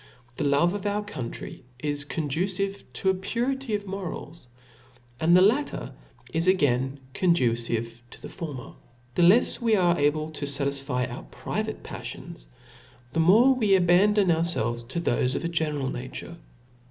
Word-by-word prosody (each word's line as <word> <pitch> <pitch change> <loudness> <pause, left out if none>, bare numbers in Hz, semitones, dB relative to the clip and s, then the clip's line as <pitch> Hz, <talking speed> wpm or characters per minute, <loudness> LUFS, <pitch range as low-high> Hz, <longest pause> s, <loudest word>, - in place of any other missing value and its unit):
The - - -1
love 145 +6 +3
of 205 0 -3
our 205 +1 -1
country 130 - -7
is 145 +1 -2
conducive 185 +7 -2
to 190 - +1
a - - 0
purity 235 +5 -2
of 205 0 -4
morals, 180 -6 -7 0.7
and 170 +3 +5
the 185 - +6
latter 250 +9 +1 0.4
is 165 +2 +2
again 140 -7 +2
condu 170 -8 +3
cive 115 0 -3
to - - -10
the - - -8
former. 150 -8 -7 0.4
The 175 - +1
lefs 195 +10 +5
we 230 -2 +3
are 175 -4 +3
able 155 +2 +1
to 145 -2 -4
fatisfy 140 -2 -1
our 120 - -7
private - - -4
paflions, - - -8 0.7
the 165 - 0
Imore 225 +11 +6
we 215 -6 +3
abandon 190 +2 +4
ourfelves 120 -9 0
to 130 +7 -3
thofe 130 -5 0
of - - -2
a - - 0
general 150 -5 -1
nature. 130 +6 -7
170 Hz, 155 wpm, -26 LUFS, 140-195 Hz, 0.7 s, the